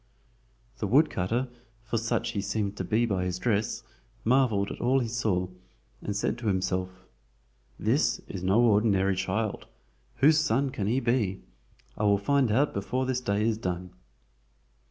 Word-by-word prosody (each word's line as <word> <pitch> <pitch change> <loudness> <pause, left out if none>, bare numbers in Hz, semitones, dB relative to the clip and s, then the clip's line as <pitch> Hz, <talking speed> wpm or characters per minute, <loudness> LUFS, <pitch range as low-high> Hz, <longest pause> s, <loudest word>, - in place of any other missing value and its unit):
The 105 - -1
woodcutter, 125 - +2 0.4
for 115 0 -1
such 115 +1 -1
he 105 -4 -2
seemed 105 0 -2
to - - -2
be 110 +6 +1
by 95 -5 -1
his 90 -1 -2
dress, 110 +2 -1 0.4
marveled 115 -5 +2
at - - -7
all 125 +3 +3
he 125 -3 0
saw, 110 -6 0 0.5
and 105 - -3
said 115 - -1
to 115 - -4
himself: 95 -1 -1 0.7
"This - - +1
is 95 - -6
no 95 +5 +3
ordinary 100 -4 +3
child. 105 +3 -2 0.5
Whose 150 +2 +5
son 140 -2 +1
can 105 -7 -3
he 120 +5 +2
be? 115 -6 0 0.6
I 105 - +1
will 100 -1 +4
find 130 +3 +2
out 140 +7 +2
before 125 +6 -1
this 130 -1 -1
day 105 -2 0
is 110 -1 0
done." 90 -2 -4
110 Hz, 155 wpm, -28 LUFS, 95-120 Hz, 0.7 s, Whose